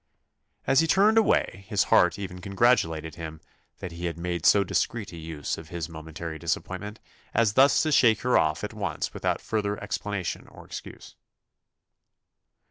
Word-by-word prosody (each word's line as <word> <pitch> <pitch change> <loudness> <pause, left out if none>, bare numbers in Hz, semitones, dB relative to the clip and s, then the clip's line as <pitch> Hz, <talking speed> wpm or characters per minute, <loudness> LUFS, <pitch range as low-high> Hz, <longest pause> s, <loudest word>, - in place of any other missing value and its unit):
As 135 - +4
he 165 - +3
turned 210 +6 +5
away, 100 - +1
his 105 -2 +2
heart 90 +2 +5
even 90 -2 -7
congratulated 90 -7 +1
him 80 -1 -8 0.4
"that 90 - -7
he 85 +1 -6
had 85 -1 -5
made 85 -1 -1
so 100 - +6
discreet 100 +3 -2
a - - -7
use 80 -3 -5
of 80 - -12
his 85 -3 -4
momentary 80 0 -7
disappointment, 105 +7 -4 0.4
as 115 -3 +3
thus 135 +4 +5
to 155 - 0
shake 115 -6 +4
her 125 0 +1
off 75 -1 +2
at - - -4
once - - -3
without - - -1
further 105 -2 -2
explanation 100 -4 -4
or - - -14
excuse." - - -10
95 Hz, 160 wpm, -26 LUFS, 80-110 Hz, 0.4 s, so